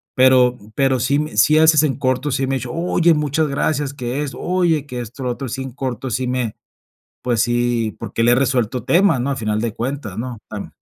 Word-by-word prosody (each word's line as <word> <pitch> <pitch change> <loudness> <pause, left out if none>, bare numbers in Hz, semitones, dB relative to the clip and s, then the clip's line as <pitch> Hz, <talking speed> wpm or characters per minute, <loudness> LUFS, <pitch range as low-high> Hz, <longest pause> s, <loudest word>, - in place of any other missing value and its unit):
pero 125 -1 +5 0.2
pero 135 -2 +2
sí 140 +4 +1
me 150 0 -4
sí 155 - +5
haces 160 -1 +6
en 145 -4 +1
corto, 130 +1 0
sí 135 +1 0
me 135 - 0
ha - - +1
dicho: - - -6
"Oye, 170 0 +2
muchas 150 +1 0
gracias, 140 0 -1
qué 130 0 -3
esto 140 - -6
oye, 175 -5 +1
que 125 -2 -5
esto, 120 +3 -8
lo 125 - -1
otro", 135 +2 -5
sí, 130 +3 -4
en 135 - -7
corto, 130 -1 -4
sí 125 +3 -1
me 125 -3 -2 0.7
pues, 120 -3 +1
sí, 120 -2 0
porque 115 - -3
le 120 - +5
he - - +6
resuelto 125 -2 0
temas, 175 -3 +3
¿no?, 135 +3 -1
a 140 - -2
final 110 -3 -1
de 115 -1 -2
cuentas, 120 -5 -4
¿no? 120 -1 -5
Tam 105 -2 -7
130 Hz, 225 wpm, -19 LUFS, 120-145 Hz, 0.7 s, haces